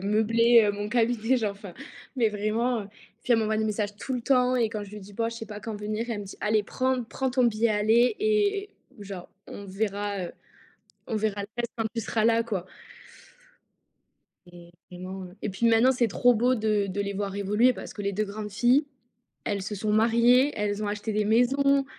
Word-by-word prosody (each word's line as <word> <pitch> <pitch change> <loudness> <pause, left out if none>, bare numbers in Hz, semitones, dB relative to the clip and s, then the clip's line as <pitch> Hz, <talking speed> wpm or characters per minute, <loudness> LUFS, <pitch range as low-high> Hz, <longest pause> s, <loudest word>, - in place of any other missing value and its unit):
meubler, 225 +3 +4
heu, 205 - +1
mon 205 +1 -4
cabinet, 235 +1 +1
genre, 220 -4 0
enfin, 200 -3 -11 0.4
mais 230 -4 +2
vraiment, 215 +3 -1
heu, 200 - -13 0.3
puis 245 - +3
elle 225 - +2
m'envoie 215 0 0
des 220 - 0
messages 210 -1 -2
tout 260 +5 -4
le 245 - -3
temps 255 0 +3
et 230 -3 +1
quand 215 -2 -4
je 200 - -13
lui 210 - -8
dis: 200 +1 -13
«B 230 - -7
oh 230 - +2
je - - -8
sais 225 - -6
pas 210 -1 -8
quand 220 +1 -5
venir», 215 +2 -3
elle 210 - -3
me 205 - -7
dit: 195 - -11
«Allez, 215 0 +2
prends 255 +3 -1
prends 265 +3 -3
ton 255 0 +2
billet, 230 0 +2
allez 220 - +3
et 415 -2 +2
et 410 - -13 0.3
genre, 195 -3 -8 0.2
on 200 - -8
verra, 200 -1 -2
heu, 170 - -7 0.8
on 225 - -2
verra 210 -1 -1
le 200 - -6
reste 240 -1 -2
quand 225 - -1
tu 230 - -2
seras 220 0 -1
là, 230 0 +4
quoi». 200 -6 -3 1.8
Et 175 -1 -14 0.2
vraiment, 185 +1 -7
et 210 - -2
puis 215 +5 0
maintenant, 230 +3 +5
c'est 245 -2 +1
trop 245 +5 +3
beau 245 +3 +2
de 215 -3 0
de 195 +1 -2
les 200 0 -3
voir 200 0 -3
évoluer 210 +5 +3
parce - - -9
que 205 - -6
les 200 0 -2
2 215 - 0
grandes 210 +1 -6
filles, 245 +8 +3 0.6
elles 200 -1 -2
se 210 +2 -4
sont 210 +1 -2
mariées, 235 +5 +4
elles 210 0 -1
ont 205 - -2
acheté 210 +1 -3
des 210 0 +1
maisons, 275 +5 +3
215 Hz, 220 wpm, -26 LUFS, 205-240 Hz, 1.8 s, maintenant